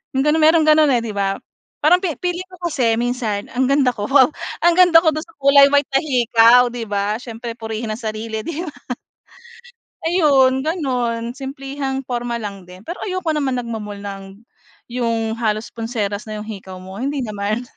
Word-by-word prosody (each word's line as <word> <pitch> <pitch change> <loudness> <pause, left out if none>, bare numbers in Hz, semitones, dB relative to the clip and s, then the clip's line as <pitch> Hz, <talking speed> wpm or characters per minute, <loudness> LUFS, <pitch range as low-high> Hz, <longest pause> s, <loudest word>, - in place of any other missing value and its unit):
'yong 265 - +2
gano'n, 300 +2 +2
mayroong 320 +1 +5
gano'n, 310 0 +6
eh, 235 - -2
'di 225 - -4
ba? 200 -1 -1 0.5
Parang 350 +4 +5
fe 360 -5 -2
feeling 360 +1 -2
ko 365 -1 -15
kasi 235 -6 +2
minsan 230 -3 -2
ang 255 +1 +1
ganda 275 -2 +3
ko, 205 -4 -5
wow! 270 0 +5 0.3
Ang 345 0 +5
ganda 350 -2 +7
ko 320 - +4
do'n 310 0 -4
sa 330 - -21
kulay 280 0 +6
white 285 0 +2
na 270 - +3
hikaw 240 -3 +5
'di 235 -2 -5
ba? 205 +1 -1
Siyempre 235 -1 -7
purihin 220 0 -4
ang 215 - -5
sarili, 220 0 -4
'di 335 +7 -5
ba? 300 - -7 1.3
Ayun, 275 -6 +3
gano'n. 245 -7 -2
Simplehang 270 0 -4
porma 240 -1 -3
lang 200 -3 -7
din 180 +1 -13
pero 345 - -6
ayoko 370 -3 -2
naman 265 -4 0
nagmo-mall 220 -4 -6
ng 200 -1 -7 0.7
'yong 230 -2 -1
halos 215 -1 -1
pulseras 220 -3 -3
na 215 -1 -5
'yong 210 - -8
hikaw 195 -3 -8
mo, 190 +1 -10
hindi 280 +3 -2
naman. 210 +1 -3
245 Hz, 180 wpm, -20 LUFS, 220-285 Hz, 1.3 s, ganda